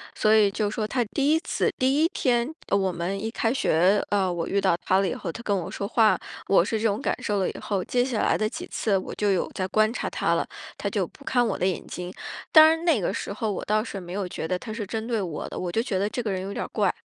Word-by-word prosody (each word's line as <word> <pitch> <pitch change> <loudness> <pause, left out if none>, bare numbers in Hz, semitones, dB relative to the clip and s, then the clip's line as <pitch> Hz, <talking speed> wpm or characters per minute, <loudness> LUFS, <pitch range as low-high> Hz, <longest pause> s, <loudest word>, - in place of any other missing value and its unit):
所 215 - +3
以 210 -2 +5
就 210 +1 -1
说 215 0 -2
他 245 0 0
第 280 +7 +1
1 320 - +4
次 - - 0
第 270 +4 +2
1 - - +5
天， 250 -2 0
呃， 200 - +2
我 190 -1 +1
们 175 +3 -3
一 220 - -1
开 225 0 0
学， 190 -3 +3
呃， 195 -3 +1
我 170 -1 -2
遇 200 - +1
到 190 -3 +3
他 190 +1 +3
了 195 - +1
以 - - -1
后， 170 - -5
他 230 - -9
跟 205 - +1
我 175 - -4
说 200 - -4
话， 225 -1 +4 0.3
我 195 -2 +5
是 220 - -1
这 225 - +3
种 205 +1 -1
感 - - 0
受 205 -2 0
了 190 - +1
以 - - -7
后， 195 -3 -2
接 245 +5 +1
下 250 -4 -1
来 - - +2
的 215 0 0
几 - - -6
次 205 -3 0
我 185 - -5
就 205 -1 +1
有 185 - 0
在 185 - -2
观 215 +3 +3
察 - - -3
他 - - 0
了。 - - 0 0.3
他 - - -2
就 - - 0
不 280 - -17
看 245 -1 +2
我 220 - -1
的 185 - 0
眼 185 - -2
睛， 180 0 -6 0.4
当 315 -1 +10
然 325 +1 +2
那 315 -10 +4
个 175 - -1
时 - - -4
候 215 +1 -2
我 195 - -4
倒 215 +1 +2
是 200 -4 -6
没 175 -1 -8
有 195 -1 -2
觉 160 - -5
得 180 - 0
他 220 +4 -7
是 215 -2 -4
针 220 +1 -3
对 230 -4 0
我 165 -5 -4
的， - - -7
我 180 -1 -3
就 225 - +1
觉 205 -7 -1
得 205 +2 0
这 245 - -3
个 210 - -1
人 185 - -2
有 195 +1 -5
点 - - -3
儿 - - -10
怪。 - - +2
205 Hz, 315 characters per minute, -25 LUFS, 190-230 Hz, 0.4 s, 当